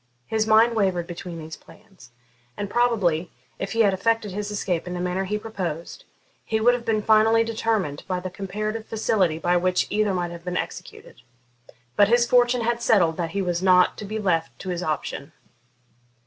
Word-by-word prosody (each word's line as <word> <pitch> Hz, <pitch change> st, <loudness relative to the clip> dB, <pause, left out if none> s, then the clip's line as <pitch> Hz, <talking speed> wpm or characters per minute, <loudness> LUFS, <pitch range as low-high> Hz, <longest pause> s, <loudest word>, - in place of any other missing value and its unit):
His 220 Hz, -, -1 dB
mind 225 Hz, +2 st, +5 dB
wavered 190 Hz, -5 st, +1 dB
between 175 Hz, 0 st, -7 dB
these 160 Hz, 0 st, -8 dB
plans, 195 Hz, -, -18 dB, 0.5 s
and 205 Hz, -1 st, -4 dB
probably, 200 Hz, -9 st, +1 dB, 0.3 s
if 195 Hz, -, -4 dB
he 230 Hz, -, +2 dB
had 200 Hz, -3 st, +4 dB
effected 225 Hz, +2 st, 0 dB
his 205 Hz, +2 st, -4 dB
escape 185 Hz, -5 st, -2 dB
in 180 Hz, -, -4 dB
the -, -, -4 dB
manner 180 Hz, +2 st, -1 dB
he 210 Hz, +2 st, -2 dB
proposed, 185 Hz, -7 st, -6 dB, 0.4 s
he 220 Hz, -, -1 dB
would 240 Hz, +3 st, +4 dB
have 245 Hz, -1 st, -4 dB
been 215 Hz, -2 st, 0 dB
finally 220 Hz, +1 st, +4 dB
determined 220 Hz, -9 st, -1 dB
by 185 Hz, -1 st, -1 dB
the 185 Hz, 0 st, -6 dB
comparative 215 Hz, +3 st, -4 dB
facility 200 Hz, -7 st, +1 dB
by 175 Hz, +2 st, +1 dB
which 180 Hz, +1 st, +1 dB
either 210 Hz, -1 st, +1 dB
might 175 Hz, -1 st, -2 dB
have 170 Hz, 0 st, -9 dB
been 180 Hz, 0 st, -3 dB
executed. -, -, -7 dB, 0.7 s
But 205 Hz, -, +5 dB
his 235 Hz, +2 st, +4 dB
fortune 245 Hz, 0 st, +3 dB
had 235 Hz, +1 st, -1 dB
settled 180 Hz, -9 st, +3 dB
that 170 Hz, -2 st, -2 dB
he 195 Hz, -, +1 dB
was 175 Hz, -1 st, -1 dB
not 185 Hz, -1 st, +4 dB
to 210 Hz, -, -6 dB
be 215 Hz, +2 st, -4 dB
left 170 Hz, -6 st, -1 dB
to 190 Hz, -, -6 dB
his 175 Hz, -1 st, -2 dB
option. 155 Hz, -2 st, -4 dB
195 Hz, 190 wpm, -24 LUFS, 175-220 Hz, 0.7 s, mind